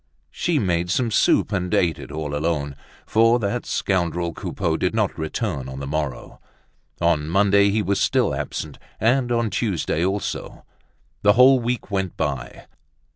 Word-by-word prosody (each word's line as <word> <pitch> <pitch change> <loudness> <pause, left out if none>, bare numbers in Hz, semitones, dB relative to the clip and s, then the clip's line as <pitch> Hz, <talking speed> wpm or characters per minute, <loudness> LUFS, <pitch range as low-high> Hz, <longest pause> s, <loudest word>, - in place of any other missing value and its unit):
She 175 -3 0
made 90 -7 0
some 115 +5 0
soup, 105 - +3
and 90 -3 -1
ate 85 -5 +1
it - - -9
all 75 -2 -4
alone, 75 -2 -1 0.3
for 115 +2 +4
that 115 +1 -2
scoundrel 85 -3 -1
Coupeau - - -2
did - - -1
not - - 0
return 80 - -3
on 65 0 -7
the 70 - -5
morrow. 75 -2 -4 0.6
On 80 -3 +1
Monday 100 +2 +4
he 105 +1 +1
was 100 0 0
still - - +2
absent, 75 -2 -5 0.2
and 120 +3 +2
on 115 -3 0
Tuesday 95 -5 -1
also. 95 +2 -3 0.6
The 105 0 +5
whole 130 +3 +6
week 120 -2 -3
went 95 -2 -2
by. 70 -5 -4
95 Hz, 155 wpm, -22 LUFS, 80-110 Hz, 0.6 s, whole